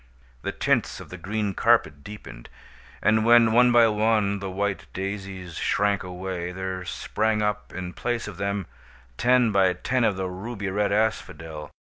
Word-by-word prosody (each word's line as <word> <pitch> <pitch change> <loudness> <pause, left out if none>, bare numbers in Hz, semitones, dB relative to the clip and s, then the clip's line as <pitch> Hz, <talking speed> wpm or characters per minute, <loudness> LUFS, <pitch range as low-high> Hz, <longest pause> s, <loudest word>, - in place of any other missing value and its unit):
The - - -3
tints - - 0
of - - -11
the 90 - -8
green 105 +2 -2
carpet 75 -5 +2
deepened; 100 -13 -10 0.5
and 110 +1 +4
when, 115 0 +6
one 125 +2 +5
by 120 -1 +6
one, 105 -2 +1
the 95 -1 -5
white 100 +1 -2
daisies 95 -3 -5
shrank 100 0 +1
away, 90 -1 -5
there 95 0 -4
sprang 110 +4 -1
up 105 0 -2
in 90 -1 -6
place 120 -2 -2
of 100 -5 -8
them, 100 -1 -2 0.5
ten 125 -2 +4
by 95 -2 +3
ten 125 +8 -1
of 105 - +2
the 95 0 -2
ruby 100 +2 -5
red 100 +1 0
asphodel. 80 -8 -2
100 Hz, 160 wpm, -25 LUFS, 95-110 Hz, 0.5 s, when